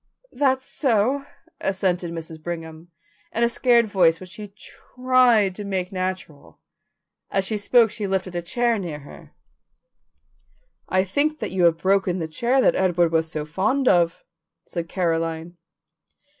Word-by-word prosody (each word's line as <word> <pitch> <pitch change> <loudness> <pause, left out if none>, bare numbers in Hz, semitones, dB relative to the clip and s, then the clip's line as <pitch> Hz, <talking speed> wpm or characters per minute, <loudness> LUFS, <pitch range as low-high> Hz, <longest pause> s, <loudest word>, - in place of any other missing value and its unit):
"That's 260 -1 +1
so," 265 +2 0 0.3
assented 185 -3 -1
Mrs. 160 -1 -8
Brigham, 165 0 -7 0.4
in 230 - +1
a - - +5
scared 235 0 +3
voice 175 -6 +3
which 185 -1 -11
she 210 +1 -8
tried 235 +1 +1
to 205 - -7
make 190 -2 -3
natural. 185 -5 -5 0.7
As 195 0 0
she 215 - -2
spoke 225 +2 +3
she 210 -2 -4
lifted 190 -1 -2
a 175 - -1
chair 235 +5 0
near 160 -6 -6
her. 140 - -14 1.5
"I 185 0 +2
think 290 +11 -1
you 185 -2 +1
have 165 -1 +4
broken 190 0 +1
the 165 -3 -3
chair 240 +11 +1
that - - +4
Edward 175 -3 +2
was 160 -1 0
so 150 -1 -4
fond 215 - 0
of," 170 -1 +3 0.4
said 170 -2 -5
Caroline. 165 -1 -2
190 Hz, 145 wpm, -23 LUFS, 170-230 Hz, 1.5 s, a